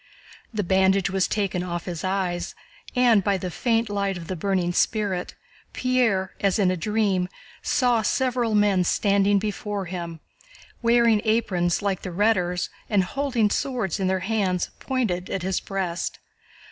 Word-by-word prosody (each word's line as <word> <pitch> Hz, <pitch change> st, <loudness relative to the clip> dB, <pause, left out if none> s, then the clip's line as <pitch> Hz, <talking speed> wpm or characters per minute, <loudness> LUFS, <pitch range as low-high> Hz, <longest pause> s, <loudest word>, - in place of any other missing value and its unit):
The 215 Hz, -3 st, -1 dB
bandage 190 Hz, 0 st, +3 dB
was 190 Hz, -1 st, +1 dB
taken 195 Hz, -4 st, -1 dB
off 175 Hz, -1 st, -4 dB
his 175 Hz, -3 st, -5 dB
eyes 185 Hz, -2 st, -2 dB, 0.4 s
and, 240 Hz, -5 st, +4 dB
by 200 Hz, 0 st, +2 dB
the 185 Hz, -1 st, -4 dB
faint 230 Hz, +3 st, +1 dB
light 200 Hz, -2 st, -1 dB
of 170 Hz, -, -8 dB
the 185 Hz, -, -3 dB
burning 180 Hz, 0 st, 0 dB
spirit, 200 Hz, -3 st, 0 dB, 0.4 s
Pierre, 235 Hz, -7 st, +1 dB
as 195 Hz, -2 st, +2 dB
in 190 Hz, -4 st, +3 dB
a -, -, 0 dB
dream, 195 Hz, -1 st, 0 dB, 0.3 s
saw 245 Hz, -5 st, +2 dB
several 245 Hz, -1 st, 0 dB
men 205 Hz, -3 st, +3 dB
standing 200 Hz, +2 st, +3 dB
before 205 Hz, 0 st, -3 dB
him, 170 Hz, -2 st, -6 dB, 0.6 s
wearing 235 Hz, -2 st, +4 dB
aprons 195 Hz, -6 st, +1 dB
like 195 Hz, -3 st, -1 dB
the -, -, -5 dB
Rhetor's 180 Hz, -2 st, +1 dB, 0.2 s
and 205 Hz, -3 st, +3 dB
holding 245 Hz, -1 st, 0 dB
swords 235 Hz, -, -1 dB
in 190 Hz, -, 0 dB
their 190 Hz, 0 st, 0 dB
hands 195 Hz, -4 st, 0 dB
pointed 215 Hz, -9 st, -1 dB
at 190 Hz, -, -3 dB
his 190 Hz, 0 st, 0 dB
breast. 180 Hz, -3 st, -3 dB
195 Hz, 150 wpm, -24 LUFS, 180-220 Hz, 0.6 s, and